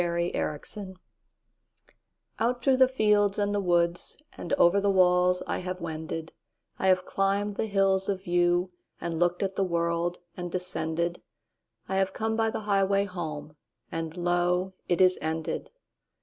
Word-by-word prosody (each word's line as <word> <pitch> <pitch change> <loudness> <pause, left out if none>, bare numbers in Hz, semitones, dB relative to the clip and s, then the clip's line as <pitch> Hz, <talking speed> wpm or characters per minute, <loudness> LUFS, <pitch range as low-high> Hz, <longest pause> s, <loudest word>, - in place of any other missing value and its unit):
Reluctance 175 +2 -3 1.4
OUT 245 +2 0
through 265 0 +4
the 260 0 +6
fields 210 -5 +2
and 205 -1 0
the 205 - +1
woodsAnd 175 - -2
over 200 -7 +4
the 200 - +2
walls 180 -1 +4
I - - -2
have 185 0 -5
wended;I 160 +2 -6
have 185 -1 +3
climbed 200 +1 0
the 220 - -1
hills 195 -1 +2
of 190 -1 -2
viewAnd 175 +1 +2 0.5
looked 175 +2 +1
at 195 0 -1
the 195 - +1
world, 170 0 0 0.2
and 175 -1 -5
descended;I 175 +1 -5
have 190 0 +1
come 220 0 -1
by 225 0 +2
the 220 - -4
highway 200 -1 +2
home, 155 -6 -6 0.4
And 165 +1 -4
lo, 175 +1 +1
it 175 0 +1
is 185 0 +5
ended. 160 0 -3
185 Hz, 135 wpm, -28 LUFS, 175-200 Hz, 1.4 s, the